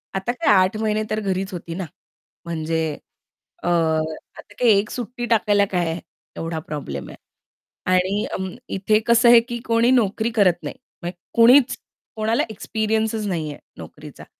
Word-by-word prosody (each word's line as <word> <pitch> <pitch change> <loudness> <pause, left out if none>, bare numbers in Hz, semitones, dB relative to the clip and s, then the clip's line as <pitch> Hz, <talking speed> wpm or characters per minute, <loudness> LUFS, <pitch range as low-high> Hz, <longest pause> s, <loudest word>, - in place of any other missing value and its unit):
आता 195 +5 -1
काय 250 -4 +2
8 190 +3 +3
महिने 215 0 0
तर 215 - -1
घरीच 195 -1 -2
होती 170 -1 -6
ना, 185 -1 -4 0.6
म्हणजे 160 -1 -2 0.8
अ, - - -2
आता 160 +3 -2
काही 240 -3 +5
1 210 - -3
सुट्टी 245 0 -5
टाकायला 205 -3 +3
काय 175 -2 0
आहे, 165 +2 -3 0.4
एवढा 165 -1 -3
प्रॉब्लेम 135 - -5
आहे? - - -11 0.8
आणि 190 +3 +1
अ, - - -2 0.4
इथे 205 +3 +2
कसं 235 +1 +5
आहे 235 -1 +9
की 240 - -3
कोणी 230 +1 +3
नोकरी 225 -2 +2
करत 180 -5 +3
नाही. - - -5 0.3
म्हणजे 175 +1 -5 0.2
कोणीच 245 +3 +6 0.4
कोणाला 220 +1 +1
एक्सपिरियन्सच 220 0 -1
नाहीये 160 -6 -3 0.2
नोकरीचा. - - -11
205 Hz, 150 wpm, -22 LUFS, 175-225 Hz, 0.8 s, आहे